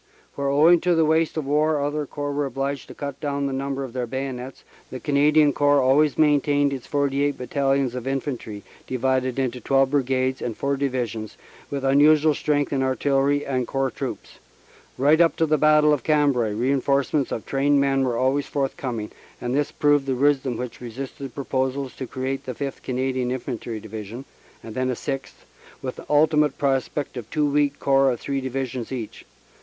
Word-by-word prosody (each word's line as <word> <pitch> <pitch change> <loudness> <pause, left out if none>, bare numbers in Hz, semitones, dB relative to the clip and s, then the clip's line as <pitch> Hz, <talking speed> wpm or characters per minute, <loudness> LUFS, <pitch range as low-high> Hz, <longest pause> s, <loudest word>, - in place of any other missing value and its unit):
Where 140 0 -3
owing 160 +5 +5
to 180 -1 +2
the 165 -1 +3
waste 160 +1 +1
of 155 - -2
war 150 +2 +2
other 145 +1 -2
Corps 145 +1 -4
were 145 0 -1
obliged 135 +1 -3
to - - -11
cut 140 -2 -6
down 140 -1 -2
the 135 - -2
number 135 0 -3
of 130 -3 -7
their 125 -2 -2
bayonets, 130 0 -5 0.3
the 130 - -6
Cana 145 +1 +2
dian 150 -2 +4
Corps 145 0 +3
always 140 +3 +3
maintained 145 -1 +3
its 130 -3 -6
forty 140 -1 0
eight 145 0 0
Battalions 135 0 0
of 125 0 -5
Infantry, 130 -6 -4 0.2
divided 130 0 0
into 125 -2 -2
twelve 135 +2 +2
Brigades 130 -2 0
and 115 -3 -4
four 140 0 0
Divisions, 125 -6 -3 0.3
with 140 -1 -3
unusual 150 +3 +5
strength 145 -1 0
in 135 - +1
Artillery 135 +2 +1
and 130 -3 -1
Corps 135 -1 -1
Troops. - - -6 0.6
Right 150 +5 +4
up 165 - +4
to 165 - +2
the 155 -1 +1
Battle 150 0 +5
of 145 - 0
Cambrai 140 -7 +2
reinforcements 140 +4 +1
of 115 - -4
trained 140 +1 +2
men 135 -1 +2
were 125 -3 0
always 135 +3 +1
forthcoming, 130 -5 -3 0.3
and 120 0 -3
this 145 +1 0
proved 145 -2 +2
the 130 - 0
wisdom 135 -2 +1
which 125 -1 -6
resisted 130 +2 -7
proposals 130 -1 -2
to 130 - -5
create 130 +2 -4
the 130 - -4
Sth. 140 +1 -5
Canadian 130 0 -1
Infantry 120 -3 -4
Divi 110 0 -7
sion, 120 +7 -8 0.4
and 110 - -8
then 130 +1 -1
a 125 - -1
sixth, 135 +2 -6 0.4
with - - -4
the - - -11
ultimate 150 -1 +3
prospect 135 0 -1
of 115 -2 -7
two 150 +3 +1
weak 145 0 +1
Corps 135 0 +3
of 120 - -3
three 140 -1 -2
Divisions 130 -2 -4
each. 120 -5 -6
135 Hz, 185 wpm, -23 LUFS, 130-145 Hz, 0.6 s, owing